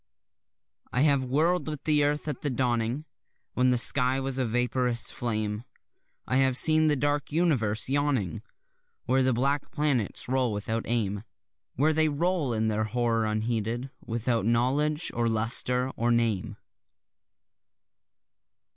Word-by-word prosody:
I 125 - 0
have 140 -3 +3
whirl'd 160 +8 +1
with 150 -3 -5
the 150 -2 +3
earth 150 +1 -1
at 150 - -4
the 145 - -1
dawning, 120 +2 -1 0.5
When 125 0 +2
the 125 - +2
sky 130 +2 +4
was 135 0 -3
a 130 - 0
vaporous 125 0 0
flame; 110 -2 -3 0.6
I 130 - 0
have 130 -1 +2
seen 155 +1 +5
the 150 - +3
dark 145 +1 -1
universe 130 -11 +1
yawning 135 - -1 0.6
Where 130 +2 +2
the 130 0 +2
black 140 +4 0
planets 145 - -1
roll 130 -3 0
without 110 +2 -3
aim, 105 -4 -1 0.5
Where 155 +4 +2
they 155 0 +2
roll 160 -2 0
in 110 -1 0
their 110 0 0
horror 115 0 0
unheeded, 115 +3 -2
without 115 -1 -1
knowledge 135 - +1
or 115 0 0
lustre 125 +3 0
or 120 +1 0
name. 115 -5 0
125 Hz, 140 wpm, -27 LUFS, 115-145 Hz, 0.6 s, seen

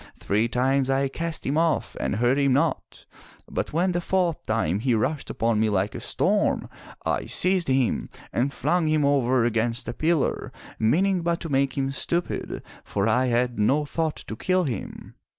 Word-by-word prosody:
Three 105 +3 +1
times 130 +2 +1
I 135 0 +1
cast 165 +3 -4
him 145 +4 +1
off 165 -1 0
and 65 - -1
hurt 120 +5 +2
him 140 -2 +3
not, 140 - -1 0.4
but - - -3
when 175 +4 +1
the 175 0 -1
fourth 175 -2 0
time 105 -5 0
he 120 +1 +1
rushed 145 +7 -1
upon 115 -1 0
me 110 0 +2
like 100 0 0
a - - -5
storm, - - +1 0.4
I - - -1
seized 185 -1 +1
him 130 -2 +1 0.2
and 130 +4 +1
flung 160 +4 0
him 155 -1 +2
over 130 -4 +3
against 115 +1 -1
a 120 - -3
pillar, 160 +2 0 0.3
meaning 180 - +2
but 170 0 0
to 165 - -5
make 135 -1 +1
him 135 0 0
stupid, 170 +5 -2 0.2
for - - -1
I 130 +1 +2
had 120 -1 0
no 140 +8 +2
thought 160 +1 -1
to 110 - -6
kill 185 +9 +1
him. 125 - -5
135 Hz, 180 wpm, -25 LUFS, 120-165 Hz, 0.4 s, him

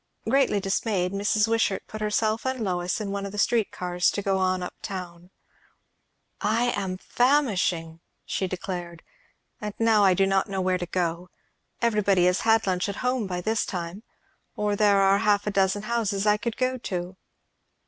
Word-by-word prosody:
Greatly 255 -4 +3
dismayed, 195 -1 -1
Mrs. 205 +2 +1
Wishart 225 -4 0
put 215 - -8
herself 215 +1 0
and 260 0 -2
Lois 180 -2 -1
in 205 -2 -4
one 200 0 -3
of 200 - -5
the 210 - -8
street 220 +1 +2
cars 180 0 0
to 205 - -3
go 195 -1 +1
on 185 -1 +1
up 180 - -6
town. 180 -2 -7 1.1
"I 230 +4 +2
am 190 -2 -3
famishing!" 190 - +1 0.3
she 190 - -2
declared. 175 -2 -6 0.6
"And 210 -1 -5
now 225 -2 +4
I 190 -2 +5
do 195 - +3
not 195 +1 +1
know 195 -1 -2
where 185 0 +1
to 175 - -4
go. 175 0 -2 0.5
Everybody 205 -5 +3
has 180 +1 +2
had 225 0 +3
lunch 185 0 0
at 200 - -4
home 250 -4 0
by 180 -1 -3
this 220 +4 0
time, 175 +2 -5 0.5
or 210 -1 0
there 205 -1 +4
are 195 +1 +4
half 205 -1 +2
a 210 - -1
dozen 195 +1 +1
houses 215 -3 -1
I 210 0 +5
could 230 +1 -4
go 255 0 0
to." 180 -4 -4
200 Hz, 180 wpm, -26 LUFS, 185-215 Hz, 1.1 s, I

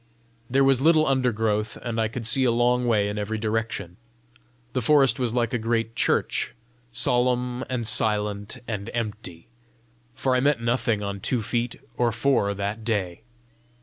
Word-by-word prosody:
There 135 +2 +3
was 135 -1 +3
little 155 +1 +5
undergrowth, 110 -5 0
and 115 -2 -2
I 110 - +1
could 115 +1 -6
see 130 +4 +2
a 125 - +3
long 120 +1 +2
way 105 -3 +2
in 105 +1 -3
every 105 +2 -3
direction. 110 -5 -3 0.8
The 130 - 0
forest 140 +2 +4
was 120 -2 -1
like 120 -1 0
a 125 - 0
great 115 0 -1
church, - - 0 0.4
solemn 125 +1 +1
and 125 -3 -2
silent 105 0 +1
and 100 -3 -4
empty, 105 -7 -5 0.7
for 130 -1 0
I - - +3
met 140 0 +2
nothing 115 -2 0
on 100 0 -4
two 115 +3 -1
feet 120 +2 -2 0.2
or 120 -1 +2
four 115 -4 +1
that 100 +3 -4
day. 100 -5 -2
115 Hz, 160 wpm, -25 LUFS, 105-125 Hz, 0.8 s, little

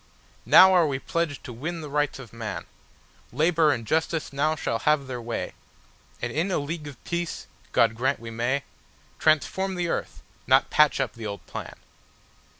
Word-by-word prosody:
Now 190 0 +9
are 175 -3 +5
we 135 -2 -1
pledged 160 +1 -2
to 125 - -8
win 160 +8 -4
the 150 - -6
Rights 145 0 0
of 130 -4 -11
man; 115 -2 -5 0.7
Labour 155 +3 +3
and 115 -5 -2
Justice 160 +2 -1
now 155 +3 +1
shall 115 -6 -2
have 150 -2 +2
their 125 -2 -5
way, 115 0 -4 0.7
And 120 0 -2
in 165 +6 0
a 185 - +1
League 150 +1 -4
of 140 -4 -11
Peace—God 170 -8 -1
grant 130 +5 0
we 115 0 -8
may—Transform 145 +8 -1
the 175 -1 -1
earth, - - -4 0.2
not 130 +2 +4
patch 150 -2 +4
up 135 -3 -1
the 115 -2 -6
old 100 -1 -7
plan. - - -7
145 Hz, 165 wpm, -26 LUFS, 125-160 Hz, 0.7 s, Now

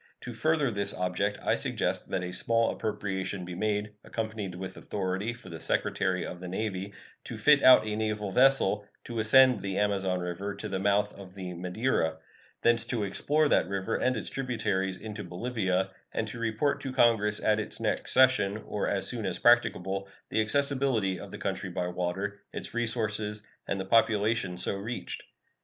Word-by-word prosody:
To 120 - -6
further 150 +1 +1
this 100 -1 -2
object 90 +3 -1
I - - +2
suggest - - -1
that 90 - -1
a 90 - -4
small 115 +4 +1
appropriation 100 -3 -3
be 90 - -6
made, 105 +2 -1
accompanied 110 -4 -4
with 95 +1 -6
authority 95 +2 -2
for 120 -5 -11
the 80 -2 -7
Secretary 95 -2 0
of 90 - -7
the 90 - -7
Navy 95 +1 -3 0.3
to - - -6
fit 150 -2 +5
out 130 -3 +8
a 105 -1 -2
naval 105 -2 -2
vessel 125 -4 +4 0.2
to 115 -1 -5
ascend 130 +4 +6
the 95 -1 -3
Amazon 95 -3 +1
River 90 +3 -4
to 110 - -6
the 95 -2 -2
mouth 100 +1 +2
of 95 -1 -12
the 90 -2 -6
Madeira; 90 -2 -1 0.5
thence 120 -1 +4
to 115 -4 -2
explore 150 +10 +1
that - - +3
river 95 -1 -1
and 130 -1 +1
its 105 - -5
tributaries 100 -8 -1
into 105 +1 -7
Bolivia, 95 0 -1 0.2
and 110 - -2
to 115 - -7
report 115 +5 0
to 135 - -4
Congress 115 -5 +3
at 110 0 +2
its 105 - -5
next - - 0
session, 125 -6 +4
or 105 - -2
as 100 - 0
soon 115 -4 -1
as 90 - -2
practicable, 100 -5 +3 0.2
the 110 - +2
accessibility 130 -5 +1
of - - -8
the - - -7
country - - -3
by 90 - -2
water, 90 +3 -3
its - - -6
resources, 110 -3 -1 0.2
and 100 - -1
the 95 - -3
population 105 -2 +2
so 90 - +1
reached. 110 +5 -5
105 Hz, 180 wpm, -29 LUFS, 95-115 Hz, 0.5 s, out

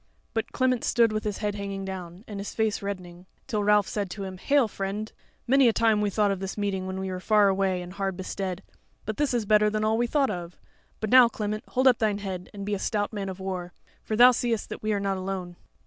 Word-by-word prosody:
But 225 - -2
Clement 255 -2 +1
stood 230 -2 +3
with 215 0 -3
his 210 -2 -2
head 210 -1 -2
hanging 200 -1 -5
down, 185 -1 -7
and 205 -2 -6
his 200 - -6
face 220 -2 0
reddening. 185 -3 -6 0.2
Till 215 -5 -1
Ralph 210 -1 +4
said 200 -3 -3
to 200 +2 -6
him: 190 -1 -7
"Hail, 280 0 +3
friend! 205 +2 -4 0.3
many 270 +1 +5
a 230 - +4
time 220 -2 +3
we 205 - +1
thought 205 0 +2
of 195 - -2
this 195 +1 -5
meeting 195 -2 -2
when 190 0 -4
we 190 0 -3
were 185 - -4
far 210 +1 +4
away 190 -2 0
and 175 +1 -9
hard 195 -2 -2
bestead; 185 0 -4 0.4
but 215 0 -4
this 295 -1 +1
is 240 -3 0
better 210 0 +4
than 215 0 -1
all 220 +1 +2
we 240 - +2
thought 275 -1 +2
of. 175 -2 -6 0.4
But 215 - -2
now, 250 -2 +8
Clement, 215 -1 -4
hold 260 +1 +2
up 250 -2 +5
thine 215 -2 +1
head 190 -3 -5
and 200 -2 -7
be 205 - -2
a 200 - -1
stout 205 +1 -1
man 200 -2 -3
of 190 0 -7
war, 185 -2 -4 0.3
for 215 - -3
thou 245 +3 +8
seest 235 -3 -1
that - - -6
we 215 - -1
are 205 - +1
not 195 -1 -1
alone." 185 -2 -4
205 Hz, 250 wpm, -27 LUFS, 190-220 Hz, 0.4 s, now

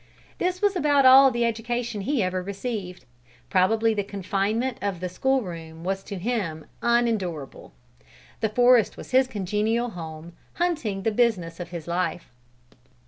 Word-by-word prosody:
This 365 +2 -1
was 405 -1 +3
about 290 -5 +3
all 265 +1 +9
the 240 -2 0
education 235 -1 -2
he 245 +2 0
ever 185 0 -1
received. 195 -1 -5 0.5
Probably 220 +4 +3
the 205 -1 -1
confinement 205 +5 -2
of 200 -3 -2
the 180 - -3
school 265 +7 +1
room 165 -3 -8
was 195 +1 -2
to 200 - -6
him 185 -7 -3 0.2
unendurable. 220 - -1 0.7
The 220 - 0
forest 245 0 +4
was - - -10
his 260 0 +4
congenial 220 +2 -1
home, 160 -2 -8 0.2
hunting 300 - -1
the 225 - +1
business 205 -8 0
of 175 - -6
his 170 -2 -7
life. 175 -2 -2
210 Hz, 145 wpm, -25 LUFS, 180-245 Hz, 0.7 s, all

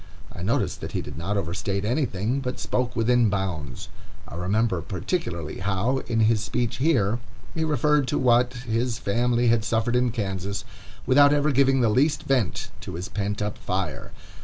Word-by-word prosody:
I - - -8
noticed 100 +6 0
that - - -6
he - - -1
did 75 - -8
not 95 +7 -2
overstate 100 +2 -2
anything, 120 -1 0
but 125 -2 -4
spoke 125 -1 -1
within 120 0 +3
bounds. 90 -10 -3 0.4
I - - -10
remember, 95 +1 0
particularly, 90 - -3
how, 100 +8 0
in 115 -1 +1
his 110 -1 +3
speech 115 +3 -1
here, 120 -7 +2 0.3
he 160 - -1
referred 150 -2 +2
to - - 0
what 125 -1 +3
his 115 +1 0
family 120 +3 +1
had 115 -1 +3
suffered 115 +1 0
in 125 0 +3
Kansas, 100 -3 -3 0.4
without 145 +2 +6
ever 150 +1 +2
giving 135 0 +3
the 115 - +3
least 140 +8 +2
vent 130 -8 0
to - - -7
his 90 +2 -5
pent 105 +1 -2
up 105 0 -4
fire. 95 -2 -3
115 Hz, 170 wpm, -25 LUFS, 100-125 Hz, 0.4 s, without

